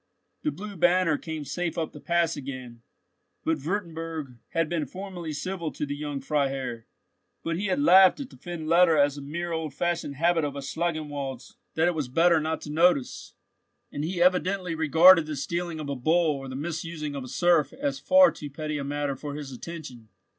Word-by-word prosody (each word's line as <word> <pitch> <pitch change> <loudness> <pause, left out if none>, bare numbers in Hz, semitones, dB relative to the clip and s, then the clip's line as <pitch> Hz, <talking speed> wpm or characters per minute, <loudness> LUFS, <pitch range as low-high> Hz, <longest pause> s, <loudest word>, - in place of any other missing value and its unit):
The 305 - 0
blue 210 -6 -7
banner 175 -1 +3
came 160 -2 -5
safe 165 +4 -3
up 160 -2 -2
the 150 - -11
Pass 170 +1 +1
again, 130 -4 -8 0.6
but 160 -3 0
Wurtemburg 165 - -4
had 165 -1 0
been 165 -2 -2
formally 185 -4 -6
civil 170 +2 -4
to - - -3
the 145 0 -4
young 145 -1 -4
Freiherr; 135 -6 -2 0.6
but 165 0 -1
he 200 +4 -2
had 275 - 0
laughed 190 -8 +7
at 275 -2 -7
the - - -13
fend 175 -3 -6
letter 165 -1 +5
as 145 0 +3
a - - -8
mere 170 +5 -4
old 160 -4 -3
fashioned 175 -4 -1
habit 165 +2 +2
of 145 -1 -2
Schangenwald's 145 -3 -4 0.2
that 160 +2 +3
it 175 - +2
was 150 -5 -2
better 165 +5 +4
not 160 +1 -2
to 150 - -7
notice, 160 -4 +1 0.6
and 145 - -4
he 175 +3 -3
evidently 180 0 +2
regarded 165 +2 +6
the 155 - -3
stealing 170 +4 -3
of 150 - -5
a 140 - -2
bull 155 +4 +2
or 135 -1 -7
the 130 - -6
misusing 160 0 -4
of 140 -2 -5
a - - -8
serf 165 +4 +2
as 275 +1 -3
far 275 0 +6
too 145 - -8
petty 150 +1 -4
a - - -3
matter 145 0 -2
for 145 +2 -6
his 145 -2 -6
attention. 130 -5 -9
160 Hz, 195 wpm, -27 LUFS, 145-175 Hz, 0.6 s, laughed